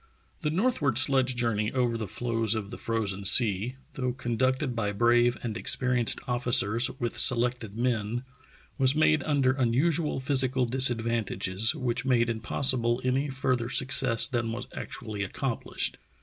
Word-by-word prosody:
The 150 - -1
northward 160 - 0
sledge 130 -2 +2
journey 115 -3 -1
over 125 -3 0
the 110 -2 -4
floes 115 +1 -2
of 105 -2 -5
the - - -8
frozen 105 -4 -3
sea, 105 +3 +5 0.2
though 125 -1 -3
conducted 130 +2 -2
by 105 -3 -2
brave 120 +2 +2
and 115 -3 -4
experi 125 +1 +1
enced 115 - +2
officers 120 -2 +2
with 120 -1 -3
selected 120 -3 +2
men, 120 -1 -2 0.6
was 135 +1 +3
made 155 -1 +2
under 135 -3 0
un 120 -3 +1
usual 155 +2 0
physical 130 -2 +1
disadvantages 115 -5 +1
which 120 -1 -3
made 120 -3 +1
impossible 120 +2 +1
any 130 +3 -1
further 130 -3 -2
success 130 -3 +3
than 120 -3 -3
was 120 +2 -6
actually 110 -6 -6
accompHshed. 120 +5 -4
120 Hz, 145 wpm, -27 LUFS, 115-130 Hz, 0.6 s, sea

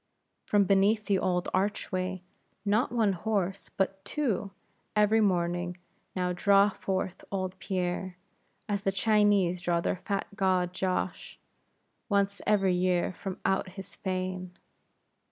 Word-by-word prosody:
From 205 -1 +4
beneath 200 +3 +3
the 200 -3 +2
old 180 -1 0
archway, 185 -1 -1 0.4
not 210 +4 +2
one 220 -5 +2
horse, 195 0 -2
but 195 0 0
two, 210 -4 -1 0.5
every 210 +1 +4
morning 175 -2 0 0.4
now 180 -1 0
draw 200 +3 +5
forth 190 -1 -3
old 190 -1 -3
Pierre, 180 -1 -2 0.5
as 205 -2 -1
the 195 - +1
Chinese 200 -3 +3
draw 175 -2 +1
their 170 - -1
fat 200 +2 -2
god 185 -3 +1
Josh, 185 0 -2 0.7
once 200 -1 +1
every 195 -3 +3
year 180 0 +1
from 190 +1 -6
out 190 0 +1
his 195 -1 -9
fane. 185 -1 -4
190 Hz, 125 wpm, -29 LUFS, 180-200 Hz, 0.7 s, draw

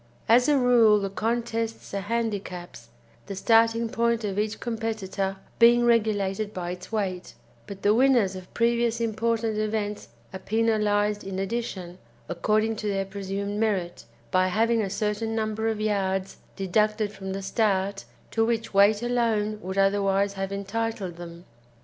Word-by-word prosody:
As 245 +3 +5
a 290 - +4
rule 235 -4 +5
the 195 -1 -3
contests 225 +1 -2
are 200 - -1
handicaps, 195 - -4 0.4
the 200 - -5
starting 230 +3 +3
point 235 0 0
of 200 -1 -2
each 215 +1 -2
competitor 220 -4 -3 0.2
being 240 +1 +6
regulated 215 -3 +1
by 175 -1 -3
its 180 +3 -9
weight; 190 -5 -3 0.3
but 200 -2 -9
the 205 - +4
winners 240 -6 +3
of 185 -1 -10
previous 235 0 +1
important 225 -1 0
events 210 -1 -2 0.3
are 190 - -5
penalised 210 -1 +1
in 190 -1 -5
addition, 190 -3 -4 0.3
according 215 +5 0
to 215 - -4
their 195 -1 0
presumed 200 +1 -4
merit, 195 -6 -1 0.3
by 185 0 +3
having 225 +4 +2
a 200 - -2
certain 210 +2 -2
number 220 0 -1
of 220 -1 -1
yards 195 -3 -1 0.2
deducted 210 +2 +1
from 190 -1 -6
the 195 0 -5
start 195 - 0 0.3
to 225 - +2
which 230 -1 -1
weight 205 +3 +4
alone 225 -3 0
would 190 0 -5
otherwise 195 0 +2
have 195 0 -4
entitled 200 -2 -3
them. 170 0 -10
210 Hz, 150 wpm, -26 LUFS, 195-225 Hz, 0.4 s, being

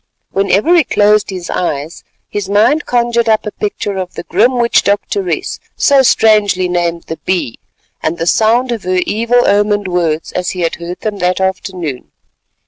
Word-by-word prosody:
Whenever 200 - +2
he 335 - +5
closed 210 -3 +2
his 180 -3 -6
eyes, 155 -2 -3 0.2
his 205 -2 -4
mind 220 +10 +2
conjured 235 -1 +1
up 220 0 +2
a 210 - -3
picture 205 -1 -4
of 180 -1 -6
the - - -6
grim 225 +9 +2
witch 235 -1 +3
doctoress, 360 - -2 0.2
so 280 -2 +4
strangely 210 -6 +3
named 170 -1 -1
the 160 - -6
Bee, 180 -11 -2 0.4
and 160 +2 -2
the 165 - -2
sound 230 +7 +2
of 230 -3 -3
her 185 0 -1
evil 235 +3 +1
omened 205 0 +2
words 165 -3 -1
as 180 -1 -2
he - - -2
had 165 - -1
heard 175 +1 -7
them 210 -2 -3
that 180 +1 0
afternoon. 185 -7 -3
200 Hz, 170 wpm, -14 LUFS, 180-225 Hz, 0.4 s, he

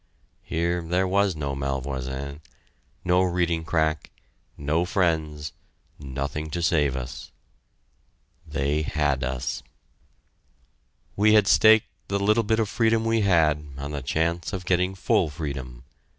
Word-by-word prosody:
Here 85 +1 -1
there 90 +3 0
was 100 -1 +2
no 70 -2 -3
Malvoisin, 70 +1 -4 0.6
no 90 +1 +4
reading 85 -2 0
crack, 80 -2 0 0.5
no 75 +4 0
friends, 80 -5 -1 0.5
nothing 70 +2 -4
to 85 +2 -3
save 75 -6 +2
us. 65 -1 -6 1.1
They 70 +3 -1
had 75 -3 0
us! 65 -1 -3 1.5
We 105 +2 +4
had 105 -2 +6
staked 110 +1 +6 0.2
the 100 - 0
little 105 +3 +3
bit 110 +1 +1
of 110 - +1
freedom 115 +1 +1
we 115 0 +2
had 80 -6 +3
on 70 +1 -5
the 75 -1 -4
chance 80 - -1
of 90 -2 -4
getting 90 +1 +1
full 95 -3 +1
freedom. 70 -5 -6
80 Hz, 125 wpm, -25 LUFS, 70-95 Hz, 1.5 s, had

